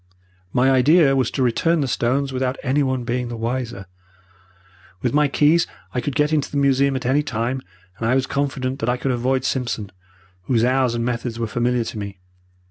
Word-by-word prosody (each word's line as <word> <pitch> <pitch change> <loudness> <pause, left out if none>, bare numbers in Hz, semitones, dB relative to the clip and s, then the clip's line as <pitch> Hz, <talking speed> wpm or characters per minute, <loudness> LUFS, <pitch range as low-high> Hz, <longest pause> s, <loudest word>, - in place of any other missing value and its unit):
"My 130 +5 +3
idea 135 +2 +5
was 130 -3 +1
to 135 - -1
return 160 +7 +2
the 135 - 0
stones 130 +3 0
without 130 0 -1
anyone 130 -2 +1
being 125 +1 -2
the 120 -1 -6
wiser. 115 -3 -3 1.2
With - - 0
my 150 0 +4
keys 150 +4 +3 0.3
I 125 - -1
could 145 - -3
get 150 +1 +2
into 150 -2 +1
the 145 - -3
museum 140 0 +3
at 130 - -4
any 135 +4 +3
time, 125 0 -2 0.4
and 115 - -1
I 130 - +3
was 130 -1 +2
confident 135 -2 -2
that 115 - -1
I 125 - +1
could 130 +1 -1
avoid 130 +2 0
Simpson, 115 -7 -2 0.5
whose 115 -2 +2
hours 130 -1 +2
and 115 0 -1
methods 120 -1 -3
were 115 - -1
familiar 120 +2 0
to 110 - -6
me. 100 -2 -6
130 Hz, 195 wpm, -21 LUFS, 120-140 Hz, 1.2 s, idea